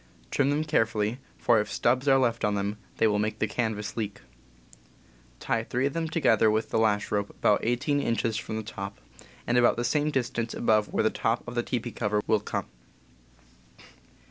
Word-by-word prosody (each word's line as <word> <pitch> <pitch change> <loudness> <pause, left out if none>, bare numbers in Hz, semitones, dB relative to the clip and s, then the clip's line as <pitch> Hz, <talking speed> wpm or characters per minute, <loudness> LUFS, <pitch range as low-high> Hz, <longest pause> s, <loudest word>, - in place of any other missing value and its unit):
Trim 140 -1 +2
them 145 +2 +1
carefully, 110 -6 0 0.2
for 120 -2 +3
if 105 - -6
stubs 130 +3 +1
are 135 -1 +6
left 120 -3 +1
on 105 -1 +2
them 100 +1 -2 0.2
they - - +3
will 105 -1 +2
make 105 +1 -1
the - - +1
canvas 105 -1 -2
leak. 105 -3 -4 1.2
Tie 115 - -1
three 125 +3 -1
of 140 - -1
them 165 -1 -1
together 115 - +3
with 110 +1 0
the - - +2
lash 105 -2 +1
rope 100 -1 0
about 105 - +2
eighteen 125 +5 0
inches 115 -2 0
from 110 0 -4
the 110 - -4
top, 100 -2 -7 0.5
and 120 +1 +3
about 120 - +4
the 120 - -1
same 145 +5 +1
distance 120 -4 -2
above 110 -2 +2
where - - +1
the 110 - +2
top 115 +2 -1
of 120 - -5
the 120 - +1
teepee 120 -1 -3
cover 105 -2 -1
will 110 - +3
come. 105 - -3
115 Hz, 195 wpm, -27 LUFS, 105-125 Hz, 1.2 s, are